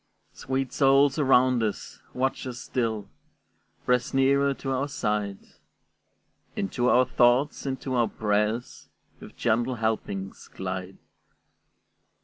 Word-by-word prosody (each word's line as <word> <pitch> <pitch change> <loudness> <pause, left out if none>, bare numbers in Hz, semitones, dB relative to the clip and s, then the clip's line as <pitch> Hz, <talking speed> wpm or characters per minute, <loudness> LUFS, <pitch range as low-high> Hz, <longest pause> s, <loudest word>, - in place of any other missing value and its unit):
Sweet 130 -1 -3
souls 135 +1 +4
around 130 -3 +4
us! 105 -3 -4
watch 130 +1 -2
us 125 -1 -6
still; 115 -5 -2 0.8
Press 125 +1 +1
nearer 140 +1 +3
to 135 - -5
our 135 +2 0
side; 105 -7 -2 1.2
Into 120 +5 0
our 125 +1 +5
thoughts, 130 +3 +2
into 130 0 -3
our 120 -2 +2
prayers, 105 +2 -2 0.3
With - - -13
gentle 120 +3 +1
helpings 110 -4 -3
glide. 95 0 -5
125 Hz, 110 wpm, -26 LUFS, 110-135 Hz, 1.2 s, our